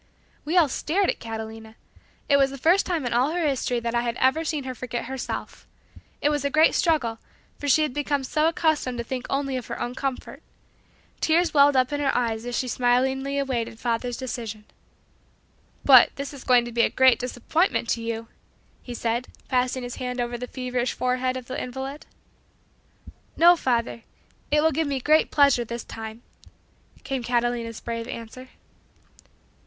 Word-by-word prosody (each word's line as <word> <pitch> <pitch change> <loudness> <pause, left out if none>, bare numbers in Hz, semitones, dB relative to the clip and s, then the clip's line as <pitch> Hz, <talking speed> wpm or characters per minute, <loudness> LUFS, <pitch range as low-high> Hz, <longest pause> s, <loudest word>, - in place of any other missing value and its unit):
We 325 +5 0
all 335 -4 +6
stared 360 +8 0
at - - -9
Catalina! 220 0 -7 0.5
It 280 - +5
was 275 -1 +4
the 275 - -8
first 340 +8 +3
time 335 -7 -1
in 240 - -1
all 250 +4 +3
her 340 0 -1
history 250 -3 0
that 235 0 -2
I 235 - +2
had 235 -1 -3
ever 265 +5 +2
seen 305 -3 -2
her 260 0 -5
forget 245 -1 -5
herself. 265 +1 -6 0.5
It 290 - +3
was 295 -2 -1
a 280 - +1
great 310 +3 +4
struggle, 250 -10 +1 0.4
for 290 - -4
she 310 +2 +4
had 300 -4 -2
become 285 -1 -1
so 305 +4 +1
accustomed 315 -6 0
to 235 - -2
think 250 +1 -5
only 275 -1 -1
of 250 - -6
her - - -5
own 240 - -3
comfort. 265 0 -4 0.8
Tears 335 +2 +2
welled 285 -1 +6
up 255 +2 +2
in 290 - -1
her 285 -2 +1
eyes 230 -1 -1
as 245 - -2
she 255 - -1
smilingly 265 +3 +1
awaited 240 -5 -2
father's 240 0 -2
decision. 225 -5 -6 1.2
"But 260 -3 +8
this 280 +1 -5
is 275 - -10
going 245 -1 +4
to 240 - -6
be 235 0 +2
a - - +3
great 260 -1 +4
disappointment 250 +5 0
to 230 - 0
you," 230 0 -4 0.5
he 245 - -7
said, 235 +2 -1 0.2
passing 255 0 0
his 245 0 -6
hand 250 -1 -4
over 240 0 -2
the 250 +1 -5
feverish 250 -1 -2
forehead 255 0 -1
of 255 - -8
the 255 - -4
invalid. 265 +3 -6 1.3
"No, 345 +1 +7
father; 235 -6 -1 0.5
it 300 0 +3
will 320 - +4
give 315 +1 0
me 275 -2 -1
great 305 +5 +3
pleasure 280 -4 +4
this 235 0 -6
time," 220 +1 -8 0.8
came 270 -2 -3
Catalina's 240 -1 -1
brave 230 0 -5
answer. 245 +3 -8
255 Hz, 180 wpm, -25 LUFS, 240-285 Hz, 1.3 s, But